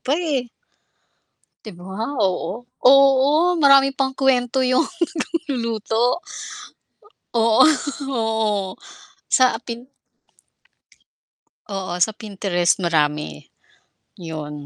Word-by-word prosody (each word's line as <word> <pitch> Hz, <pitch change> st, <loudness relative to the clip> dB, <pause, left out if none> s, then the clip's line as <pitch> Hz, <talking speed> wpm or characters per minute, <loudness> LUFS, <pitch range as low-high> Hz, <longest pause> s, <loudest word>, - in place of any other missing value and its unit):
pa, 280 Hz, +4 st, 0 dB
eh. 285 Hz, -8 st, -2 dB, 1.2 s
'Di 215 Hz, -, -8 dB
ba 190 Hz, +2 st, -9 dB, 0.2 s
oo, 195 Hz, +3 st, -1 dB, 0.2 s
oo 275 Hz, +6 st, +5 dB
maraming 275 Hz, -2 st, +5 dB
pang 265 Hz, -1 st, 0 dB
kuwento 265 Hz, -1 st, +1 dB
yung 255 Hz, +4 st, +2 dB, 0.4 s
nag-luluto. 245 Hz, -, -1 dB, 1.1 s
Oo 225 Hz, +3 st, +5 dB, 0.5 s
oo, 220 Hz, -4 st, -1 dB, 0.5 s
sa 255 Hz, -1 st, +4 dB
Pin 235 Hz, +1 st, -8 dB, 1.9 s
Oo 190 Hz, -2 st, -4 dB
sa 180 Hz, +5 st, +2 dB
Pinterest 195 Hz, -4 st, -1 dB
marami, 150 Hz, -, -1 dB, 0.8 s
yun. 150 Hz, -4 st, -7 dB
230 Hz, 80 wpm, -21 LUFS, 190-270 Hz, 1.9 s, oo